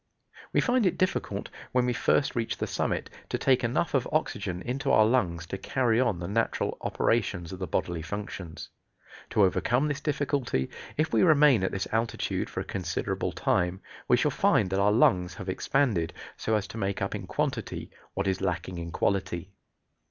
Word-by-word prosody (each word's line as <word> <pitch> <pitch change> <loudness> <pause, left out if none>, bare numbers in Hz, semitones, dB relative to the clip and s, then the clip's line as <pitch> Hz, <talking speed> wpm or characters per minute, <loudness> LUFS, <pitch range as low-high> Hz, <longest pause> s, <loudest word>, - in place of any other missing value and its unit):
We - - +3
find 245 -4 +3
it 180 - 0
difficult, 185 - -1 0.2
when 125 -1 +3
we 125 - +1
first 140 +5 +2
reach 115 -2 -1
the - - -1
summit, - - -1 0.2
to - - 0
take 130 -1 +3
enough 115 +1 0
of - - +2
oxygen 90 0 -1
into 135 +3 -2
our 110 - +6
lungs 90 -8 +1
to 95 +3 -5
carry 120 +2 +1
on 120 -8 +2
the 85 0 -5
natural 115 +4 0
operations 95 -7 0
of 95 - -7
the 90 - -3
bodily 85 +1 -1
functions. 90 -2 -6 0.6
To 105 - +3
overcome 120 +9 +2
this 145 -1 -2
difficulty, 140 - -1 0.3
if 155 +1 0
we - - +4
remain 150 - +6
at 95 - 0
this 95 - -2
altitude 115 0 -1
for - - -3
a - - -6
considerable - - -2
time, 90 0 0 0.3
we - - +5
shall - - +2
find 95 - +2
that 95 - +1
our 100 +1 +4
lungs 90 -5 +3
have 100 -4 -8
expanded, 100 -3 +1 0.2
so 110 - 0
as 105 -2 0
to 115 - -6
make 100 -1 -1
up - - -2
in - - -5
quantity - - -2 0.2
what 100 - -1
is 95 -1 0
lacking 90 0 -2
in 85 0 -5
quality. 95 0 -1
105 Hz, 185 wpm, -28 LUFS, 90-125 Hz, 0.6 s, our